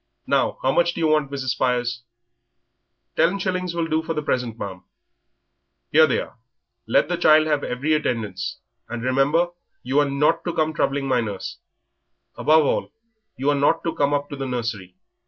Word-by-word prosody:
Now, - - +1
how 130 - +3
much 170 +4 +2
do - - -5
you 165 - +1
want, 155 -3 +2
Mrs. 135 -2 -4
Spires?" 120 -2 0 1.1
"Ten 180 +4 +3
shillings 185 -2 -2
will 170 -1 0
do 160 0 0
for 165 0 -4
the 150 - -2
present, 125 -5 -1
ma'am." 95 -4 -6 1.1
"Here 155 +1 +6
they 130 - +1
are; - - -8 0.5
let - - +3
the 175 +1 -1
child 155 -2 +5
have 150 -2 0
every 140 +6 -1
attendance, 110 -10 -2 0.3
and 120 0 -5
remember 135 +7 +2 0.3
you 130 +4 +1
are 145 -1 +2
not 150 +4 +2
to 175 - -2
come 155 0 +1
troubling 140 -2 0
my 125 -2 +2
nurse. 105 -4 -5 0.8
Above 155 0 +4
all, - - -1 0.5
you 140 +3 +1
are - - +1
not 145 +4 +2
to 165 - -1
come 140 0 +1
up 145 0 0
to - - -4
the 135 -1 -4
nursery. 115 -7 -4
140 Hz, 180 wpm, -23 LUFS, 125-155 Hz, 1.1 s, Here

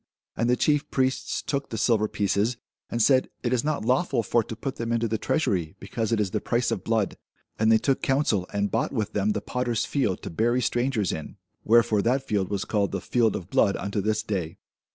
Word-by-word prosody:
And 115 +1 0
the 125 - +4
chief 150 +3 +1
priests 130 0 -1
took 140 -1 -2
the 110 - -4
silver 110 -1 +2
pieces, 105 +3 0 0.3
and 115 -1 +1
said, 130 0 +4
It 120 0 0
is 120 - +1
not 150 -7 -1
lawful 130 -1 +1
for 120 +2 +2
to 115 - -7
put 135 +4 -5
them 115 0 -3
into 115 0 +1
the 110 0 -2
treasury, 95 - 0
because 110 +3 -3
it 115 - +2
is 100 -3 0
the - - -1
price 120 0 0
of - - -2
blood. 110 -3 0 0.4
And 110 +1 +4
they 110 - +7
took 135 +4 0
counsel, 135 -9 +1
and 100 0 -1
bought 115 - 0
with 110 -6 -2
them 105 +1 +1
the 105 - -2
potter's 120 0 -1
field, 125 -10 -1
to - - -5
bury 120 +9 +1
strangers 120 -4 0
in. 80 - -6 0.3
Wherefore 110 -2 +4
that 130 +5 +1
field 100 -3 0
was 100 -2 -2
called 100 -1 0
the 100 - -1
field 115 +3 +1
of 95 -2 -7
blood 100 -3 +3
unto 100 +2 -2
this 110 +1 0
day. 90 -7 -3
115 Hz, 220 wpm, -26 LUFS, 100-125 Hz, 0.4 s, they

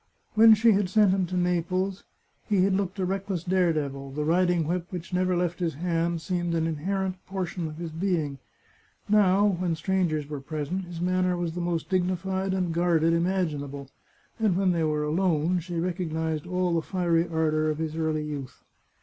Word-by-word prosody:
When 220 0 +8
she 225 +2 +4
had 200 -2 +2
sent 210 -1 +4
him 190 -1 +1
to 185 +1 -3
Naples 180 +2 -1 0.4
he 200 -3 +3
had 195 0 +2
looked 190 0 -1
a 190 - 0
reckless 190 -2 -2
daredevil; 155 -7 0
the 150 +1 -2
riding 175 0 +2
whip 175 +1 -2
which 180 0 -7
never 180 0 +1
left 175 -1 -1
his 170 -5 -1
hand 170 0 -1
seemed 175 -2 -1
an 160 -1 +1
inherent 185 +4 -2
portion 185 -3 -3
of 155 0 -8
his 170 -1 -5
being. 160 -5 -1 0.7
Now, 205 -1 +4
when 180 -4 0
strangers 160 -4 0
were 145 -2 -5
present, 155 +6 -4
his 175 -1 -8
manner 180 0 +1
was 170 -2 -2
the 175 - -4
most 170 -3 -2
dignified 190 +1 -1
and 180 -3 -1
guarded 165 -1 +2
imaginable, 150 -6 -1 0.5
and 210 -5 +2
when 190 -1 +3
they 170 -2 0
were 150 -1 0
alone 170 +1 +1
she 175 +1 -7
recognised 160 -3 -2
all 180 -1 0
the 165 - +2
fiery 170 -1 +1
ardour 155 -1 +1
of 155 - -1
his 160 -1 -3
early 160 -1 -1
youth. 140 -4 -7
175 Hz, 180 wpm, -27 LUFS, 160-185 Hz, 0.7 s, When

